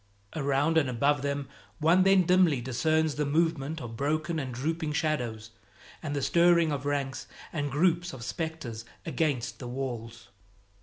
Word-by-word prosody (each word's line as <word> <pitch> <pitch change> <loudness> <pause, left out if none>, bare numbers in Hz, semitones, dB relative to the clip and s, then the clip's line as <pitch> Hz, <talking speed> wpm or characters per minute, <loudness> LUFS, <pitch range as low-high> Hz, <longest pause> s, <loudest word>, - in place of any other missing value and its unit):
Around 145 +2 +2
and 140 -4 0
above 140 +3 +2
them 140 -1 -2 0.3
one 165 +4 +4
then 195 0 +5
dimly 180 -5 +4
discerns 155 +6 +1
the 150 +1 -1
movement 160 0 0
of 120 -4 -7
broken 155 +5 -1
and 130 -3 -4
drooping 155 +5 -2
shadows, 120 -9 -2 0.5
and 145 -2 -3
the 140 - -1
stirring 170 +2 +4
of 140 -1 -3
ranks 140 -2 -2 0.3
and 145 -3 -1
groups 170 +4 +1
of 130 -3 -8
specters 155 -6 -4 0.2
against 150 -7 -1
the 125 - -6
walls. 115 -4 -5
145 Hz, 150 wpm, -29 LUFS, 130-160 Hz, 0.5 s, then